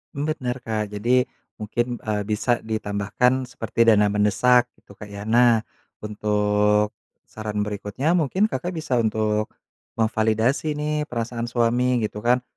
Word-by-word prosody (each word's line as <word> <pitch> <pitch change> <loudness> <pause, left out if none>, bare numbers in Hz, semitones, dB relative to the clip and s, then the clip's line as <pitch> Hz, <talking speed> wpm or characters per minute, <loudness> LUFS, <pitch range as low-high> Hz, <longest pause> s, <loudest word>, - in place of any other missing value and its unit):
Bener, 140 -4 -2
Kak. 110 -3 -3
Jadi 120 +5 +2 0.3
mungkin, 120 +3 -2
eee, 105 -1 -1
bisa 115 +3 +1
ditambahkan 110 +4 -1
seperti 115 -1 -1
dana 105 -2 +5
mendesak 120 +4 +3
gitu, - - -20
Kak, 100 +1 -11
ya. 100 0 -8
Nah, 115 0 +4 0.4
untuk 105 0 +1 0.3
saran 105 -1 -4
berikutnya 105 +9 -2
mungkin 180 +6 +1
Kakak 180 0 -3
bisa 135 -7 -1
untuk 110 -1 0 0.5
memvalidasi 110 +6 +1
nih 150 0 -2
perasaan 120 0 -3
suami 120 +1 +1
gitu 105 0 -3
kan. 125 +3 +2
115 Hz, 130 wpm, -23 LUFS, 105-125 Hz, 0.5 s, dana